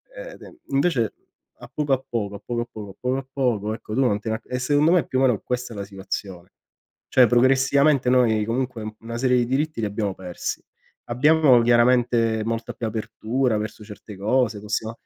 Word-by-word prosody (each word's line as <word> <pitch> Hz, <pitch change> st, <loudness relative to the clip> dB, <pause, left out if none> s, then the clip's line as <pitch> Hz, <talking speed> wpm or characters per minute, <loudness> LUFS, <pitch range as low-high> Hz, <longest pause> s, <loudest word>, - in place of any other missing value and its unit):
eh, -, -, -8 dB
e -, -, -12 dB
den 345 Hz, -, -14 dB
invece 135 Hz, -, +1 dB, 0.5 s
a -, -, -12 dB
poco 145 Hz, -2 st, 0 dB
a 130 Hz, 0 st, 0 dB
poco, 105 Hz, -4 st, -3 dB
a 100 Hz, -, -10 dB
poco 120 Hz, -1 st, -2 dB
a 120 Hz, -, -3 dB
poco, 105 Hz, -2 st, -8 dB
a 95 Hz, -, -12 dB
poco 130 Hz, +1 st, -1 dB
a 135 Hz, -, -10 dB
poco, 110 Hz, -6 st, 0 dB
ecco 110 Hz, -1 st, -8 dB
tu 130 Hz, -, 0 dB
non 105 Hz, -6 st, +2 dB
te 110 Hz, +1 st, -5 dB
ne 110 Hz, -, 0 dB
a -, -, -7 dB
e 125 Hz, -, -3 dB
secondo 145 Hz, +5 st, +3 dB
me 180 Hz, -, +5 dB
è -, -, -11 dB
più 130 Hz, -, -1 dB
o -, -, +1 dB
meno 125 Hz, -6 st, +3 dB
questa 125 Hz, -2 st, -3 dB
la 100 Hz, -, -4 dB
situazione. 95 Hz, -2 st, -6 dB, 0.6 s
Cioè 130 Hz, -, +5 dB
progressivamente 135 Hz, +3 st, +3 dB
noi 115 Hz, -4 st, +3 dB
comunque 125 Hz, 0 st, -2 dB
un 110 Hz, 0 st, -6 dB
una 115 Hz, +1 st, -6 dB
serie 125 Hz, 0 st, +2 dB
di 120 Hz, -, +2 dB
diritti 140 Hz, +2 st, -1 dB
li 110 Hz, -, 0 dB
abbiamo 100 Hz, -1 st, -2 dB
persi. 90 Hz, -2 st, -5 dB, 0.5 s
Abbiamo 135 Hz, +1 st, +4 dB
chiaramente 120 Hz, -1 st, +3 dB
molta 115 Hz, +1 st, -3 dB
più 115 Hz, -, -4 dB
apertura 110 Hz, +2 st, -1 dB
verso 110 Hz, 0 st, -5 dB
certe 105 Hz, -1 st, -11 dB
cose, 110 Hz, +1 st, +1 dB
possia 105 Hz, +1 st, -3 dB
120 Hz, 210 wpm, -23 LUFS, 110-130 Hz, 0.6 s, me